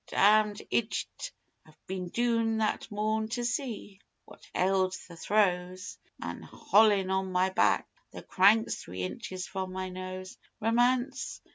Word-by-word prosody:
Damned 210 0 +4
ijjit! 230 -2 -2 0.3
I'd 155 - -20
been 185 -1 -4
doon 230 0 +1
that 220 0 -1
morn 215 +1 -1
to 240 +2 -2
see 235 -6 -3 0.3
what - - -16
ailed 185 0 +2
the 170 - -11
throws, 185 -1 0 0.2
Manholin', 205 -3 +2
on 190 0 0
my 185 +1 +2
back - - +2 0.2
the - - -10
cranks 205 +4 +3
three 90 +1 -6
inches 185 - -5
from 190 -1 -4
my 185 0 -3
nose. 185 0 -7 0.2
Romance! 245 +4 +1
200 Hz, 130 wpm, -30 LUFS, 185-220 Hz, 0.3 s, Damned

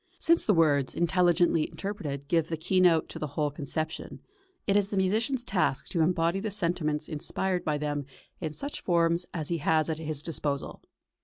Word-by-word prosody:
Since 335 0 +3
the - - +5
words, 145 -5 +3
intelligently 175 -1 +3
interpreted, 145 -9 -5
give 165 0 +2
the 165 - -2
keynote 175 -1 +3
to - - -7
the 150 - -2
whole 150 -2 +1
conception, 155 +2 -4 0.5
it 200 - +2
is 200 -1 +3
the 200 - -2
musician's 225 +7 +1
task 180 - 0
to 170 - 0
embody 170 +2 +2
the 215 +2 -3
sentiments 170 -6 -1
inspired 180 +4 -2
by 150 -1 0
them 145 -1 -3 0.3
in 155 -4 -4
such 285 - -5
forms 170 0 +2
as 155 -4 -4
he 170 -1 -1
has 155 +1 +2
at 155 - -4
his 155 -2 -2
disposal. 145 -3 -3
165 Hz, 175 wpm, -28 LUFS, 155-185 Hz, 0.5 s, the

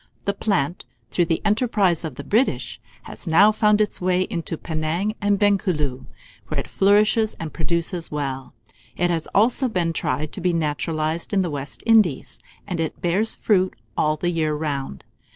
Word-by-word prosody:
The 200 - +1
plant, 185 -5 -1 0.3
through 175 - +2
the 165 -1 -1
enterprise 210 -6 +2
of 155 -6 -5
the 140 - -7
British, 225 - 0 0.2
has - - -8
now 195 +6 +6
found 210 -1 +3
its 210 -3 0
way 180 0 +2
into 170 -3 -3
Penang 160 +7 -2
and 205 0 +2
Bencooleu, 185 -10 0 0.4
where - - -2
it - - -5
flourishes 210 +2 +3
and 160 -2 -7
produces 170 +1 -1
well. 135 -4 -4 0.4
It 175 0 +1
has 165 -2 -2
also 245 +5 +3
been 175 -6 0
tried 150 0 -2
to 195 - -7
be 180 0 +1
naturalized 155 +2 -2
in 195 -1 +3
the 175 - -3
West 140 -1 -6
Indies, 215 - +3 0.3
and 180 -4 -4
it 160 -1 -3
bears 190 +6 +1
fruit 190 -3 +1 0.2
all 155 0 +1
the 175 +3 -1
year 155 -3 0
round. 140 - -4
175 Hz, 170 wpm, -22 LUFS, 155-205 Hz, 0.4 s, now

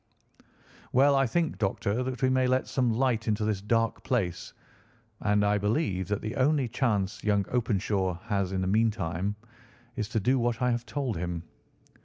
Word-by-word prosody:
Well, 140 +3 +5
I 135 -1 +3
think, 160 - -1
Doctor, 100 +2 0
that 130 0 -4
we 130 - +4
may 130 0 +3
let 130 +1 +1
some 125 -3 +1
light 120 -1 0
into 105 0 +1
this 105 -3 -1
dark 115 +2 0
place, 95 -10 -1 0.7
and 105 0 +2
I 105 0 +2
believe 100 - 0
that 105 +1 -2
the 110 +1 -4
only 140 0 +2
chance 105 -6 -1
young 100 -2 +2
Openshaw 100 -6 0
has 100 -4 -1
in 95 -1 -1
the 95 - -1
meantime 100 -3 0 0.6
is 110 -3 -3
to 110 -1 0
do 130 +6 +2
what 120 -1 0
I 125 -1 +2
have 120 0 -2
told 135 -7 -2
him. 85 -1 -3
110 Hz, 175 wpm, -28 LUFS, 100-125 Hz, 0.7 s, Well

